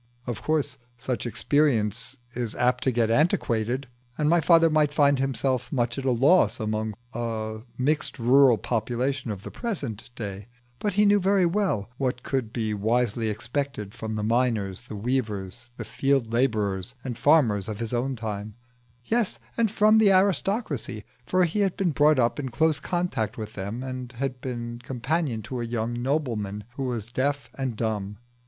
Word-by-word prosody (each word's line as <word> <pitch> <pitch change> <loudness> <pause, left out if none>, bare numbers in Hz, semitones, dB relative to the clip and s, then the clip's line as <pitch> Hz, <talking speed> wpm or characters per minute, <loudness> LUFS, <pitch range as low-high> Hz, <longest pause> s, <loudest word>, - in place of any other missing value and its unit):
Of 120 -4 -4
course 145 -4 0 0.2
such 125 -2 -3
experience 125 -2 +1 0.2
is 120 -3 -3
apt 125 0 +1
to 130 - +3
get 115 -2 +1
antiquated, 125 -3 +1 0.3
and 150 - +1
my 170 +2 +4
father 165 0 +6
might 155 -2 +3
find 145 -2 +3
himself 130 -2 -1
much 120 -1 0
at 135 - -6
a 130 - +3
loss 125 - +4
amongst 110 -1 -2 0.2
a 110 -2 -3 0.2
mixed 150 +5 0
rural 125 0 +5
population 125 +4 -1
of 100 -2 -5
the - - -7
present 140 - -4
day; 100 -3 -6 0.3
but 205 -2 -1
he 210 +1 +5
knew 205 0 +5
very 195 -1 +3
well 170 - 0
what 125 -2 -1
could 130 -5 -2
be 110 -3 -1
wisely 110 +1 +1
expected 120 -1 -3
from 110 -1 -5
the 105 - -2
miners, 115 -3 0
the 110 - -7
weavers, 110 -1 -3
the - - -5
field 135 -5 0
labourers, 110 -3 0
and 125 -3 -4
farmers 120 -8 +3
of 105 -2 -4
his 115 +1 -4
own 130 +3 0
time 105 -2 -5 0.5
yes, 230 -3 0 0.2
and 230 -2 +2
from 215 +1 +5
the 210 -3 +6
aristocracy, 190 - +1 0.2
for 185 0 +3
he 175 +4 0
had 195 -3 +1
been 190 -4 +1
brought 150 +1 +4
up 120 0 +2
in 135 -3 -3
close 155 +5 +2
contact 155 - -2
with 110 -2 -6
them 100 +6 -5
and 130 -1 -6
had 130 0 -3
been 120 -2 -5
companion 125 0 -2
to 120 +3 -4
a - - -2
young 115 0 -2
nobleman 115 -7 -1
who 135 - -3
was 120 -3 -3
deaf 140 +3 -1
and 130 -4 -3
dumb. 105 -3 -2
125 Hz, 170 wpm, -26 LUFS, 110-145 Hz, 0.5 s, father